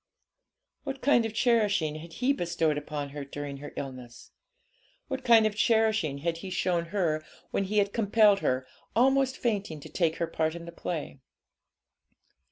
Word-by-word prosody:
What 275 -1 -5
kind 240 -5 +4
of 220 - -10
cherishing 205 -11 +2
had 165 +1 -10
he 260 +7 +1
bestowed 170 - 0
upon 145 -1 -4
her 145 0 -6
during 140 0 -6
her 145 +1 -8
illness? 130 -3 -8 0.8
What 265 -1 -3
kind 230 -3 +6
of 215 -1 0
cherishing 220 -10 +2
had 170 -1 0
he 185 +3 -7
shown 180 -2 0
her 165 -4 -1 0.3
when 195 - 0
he 210 +2 -2
had 200 -1 +2
compelled 210 -2 +4
her, 130 -5 0 0.3
almost 265 +2 +3
fainting, 205 -9 -2
to 155 - -10
take 160 0 +1
her 170 - -1
part 160 0 -1
in 170 0 -8
the 170 - -8
play? 165 -5 -5
175 Hz, 165 wpm, -28 LUFS, 155-220 Hz, 0.8 s, kind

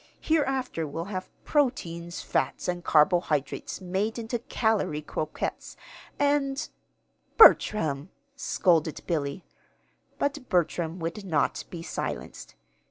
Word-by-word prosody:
Hereafter 265 - 0
we'll 165 +4 -4
have 185 0 -4 0.2
proteins, 175 - -1
fats, - - -1
and 175 -1 -2
carbohydrates 150 0 +2
made 190 +5 -1
into 230 +1 -3
calory 220 -10 0
croquettes, 155 0 -4 0.4
and 285 0 +1 0.4
" - - -42
"Bertram!" 160 - +6 0.3
scolded 170 - +1
Billy. 150 -1 -2 0.7
But 285 -2 -2
Bertram 170 -2 0
would 170 +4 -4
not 155 -7 0
be 170 -2 -7
silenced. - - -5
180 Hz, 100 wpm, -27 LUFS, 160-250 Hz, 0.7 s, Bertram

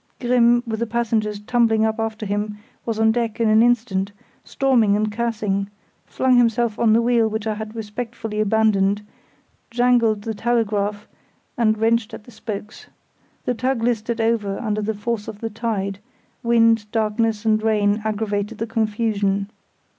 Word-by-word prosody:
Grimm, 240 -1 +3
with 220 -2 -3
the 235 - -1
passengers 220 -2 -1
tumbling 225 0 +2
up 220 +1 -1
after 220 -1 -3
him, 205 +1 -2 0.3
was 225 -1 -2
on 220 0 +4
deck 230 -1 -2
in 230 - +2
an 215 +1 +5
instant, 225 -5 +1 0.3
storming 240 -7 +2
and 215 0 0
cursing; 210 -3 -1 0.4
flung 260 -1 +2
himself 235 -2 +2
on 225 -2 +4
the 230 +1 +3
wheel 235 -2 +3
which 220 -1 -3
I 220 - 0
had 215 +1 -7
respectfully 225 0 -5
abandoned, 210 -1 +2 0.6
jangled 235 -3 +2
the 225 - -3
telegraph, 210 -2 -1 0.5
and 220 -2 +2
wrenched 225 +1 +1
at - - -12
the 245 - -15
spokes. 210 -1 -7 0.6
The 250 - +1
tug 250 0 -1
listed 235 0 -1
over 225 -3 0
under 215 -3 -2
the 215 +1 -2
force 210 +1 -3
of 205 - -7
the 225 0 -4
tide; 205 -3 -3 0.4
wind, 230 -3 +3
darkness, 220 0 0
and 215 -1 +3
rain 210 -1 +1
aggravated 210 -1 -2
the 225 - -2
confusion. 210 -3 -1
220 Hz, 155 wpm, -21 LUFS, 210-235 Hz, 0.6 s, an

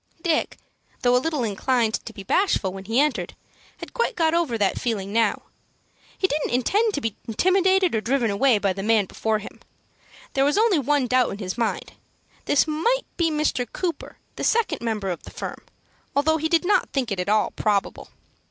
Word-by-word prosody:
Dick, 330 -3 0 0.5
though 245 0 +4
a 250 - +3
little 305 -3 -1
inclined 225 +2 0
to - - -8
be 200 -3 -10
bashful 200 - +1
when 195 0 -8
he 225 +5 +1
entered, 295 -1 0 0.4
had - - -10
quite 470 -1 0
got 325 -2 +2
over 335 -9 +1
that 200 -3 0
feeling 205 -4 -2
now. 225 -2 +1 0.7
He - - 0
didn't 300 -3 -1
intend 410 - +1
to 285 - -2
be 225 -4 -2
intimidated 375 - +2
or 220 - +1
driven 240 -1 +1
away 235 +3 +3
by 200 -2 0
the 195 - -5
man 215 0 +3
before 220 +3 -1
him. 210 - -10 0.7
There 270 - +2
was 290 +6 +2
only 425 -6 +4
one 285 0 +1
doubt 250 0 +2
in 200 - -5
his 185 -3 -4
mind. 230 -2 -2 0.5
This 290 - +3
might 460 +12 +1
be 335 -2 +1
Mr. 300 -6 -1
Cooper, 350 -3 -4 0.2
the - - -4
second 445 - +1
member 215 -5 -2
of 175 - -5
the - - -11
firm, - - -7 0.5
although 315 +3 +3
he 320 +1 -1
did 335 +1 +2
not 410 - +2
think 255 -5 -2
it 195 - -2
at 180 - -2
all 215 0 +2
probable. 205 -2 -1
255 Hz, 195 wpm, -24 LUFS, 215-325 Hz, 0.7 s, though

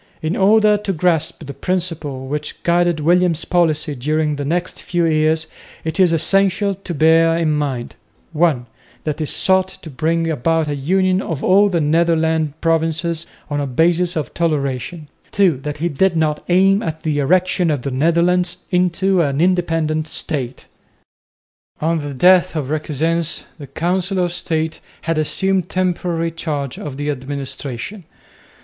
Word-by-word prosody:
In 160 +3 -1
order 210 +1 +4
to 205 -1 -3
grasp 165 -2 0
the 140 - -7
principles 165 -8 -3
which 150 0 -5
guided 175 -2 +2
William's 170 0 +2
policy 160 -3 +1
during 150 +3 -1
the 145 - -3
next 170 +5 -2
few 175 -1 0
years 155 0 +2 0.4
it 160 +2 -2
is 180 -3 +5
essential 195 +4 +2
to 185 -2 -7
bear 165 +2 +4
in 165 -2 +1
mind 140 -5 -2 0.4
(1) 155 -6 +2 0.4
that 150 0 -3
he 155 - -2
sought 190 +1 +2
to 165 -4 -10
bring 165 +4 0
about 160 +1 0
a 145 - -2
union 185 +6 +1
of 160 -7 -4
all 200 +2 +5
the 175 -3 0
Netherland 160 -1 +1
provinces 165 0 0 0.2
on 145 -1 -2
a 140 - -1
basis 170 +6 +1
of 155 -3 -3
toleration, 150 -1 -2 0.3
(2) 190 -8 +3
that 150 +3 -5
he 165 +3 -1
did 175 +3 +1
not 155 -2 0
aim 195 +3 +4
at 160 -7 -5
the 150 -2 0
erection 180 +3 +2
of 145 -5 -1
the 140 - -3
Netherlands 170 +5 +1
into 180 +1 +2
an 140 -3 0
independent 165 -3 +1
State. 135 -6 -4 1.1
On 165 +1 0
the 145 -2 -5
death 180 +4 +4
of 145 -3 -3
Requesens 160 +2 -1 0.2
the 140 - -8
Council 180 +6 -1
of 175 -1 0
State 160 -2 -2 0.2
had 165 -1 -1
assumed 190 +4 0
temporary 175 -2 -1
charge 145 -5 -4
of 140 -3 -6
the 145 +1 -1
administration. 140 - -5
165 Hz, 155 wpm, -19 LUFS, 150-180 Hz, 1.1 s, is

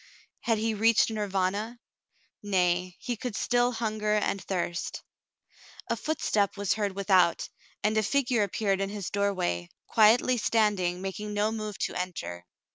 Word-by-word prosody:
Had 225 -2 +1
he 220 +1 0
reached 225 +1 +3
Nirvana? 205 +2 -1 0.6
Nay, 180 -2 +1
he 245 -1 -3
could 240 -1 -5
still 245 0 +2
hunger 215 -2 -1
and 200 -2 0
thirst. 175 -2 -3 0.9
A - - +2
footstep 210 -10 0
was 200 -1 +1
heard 205 -3 -2
without, 190 -3 +3 0.4
and 215 +1 +2
a 215 - +4
figure 245 0 +1
appeared 200 -1 0
in 195 - -1
his 205 -3 -5
doorway, 185 - -1 0.2
quietly 230 +3 +4
standing, 205 -6 +1
making 210 +2 -4
no 210 +1 +1
move 215 -2 -4
to - - -2
enter. 130 - -5
205 Hz, 140 wpm, -28 LUFS, 190-220 Hz, 0.9 s, a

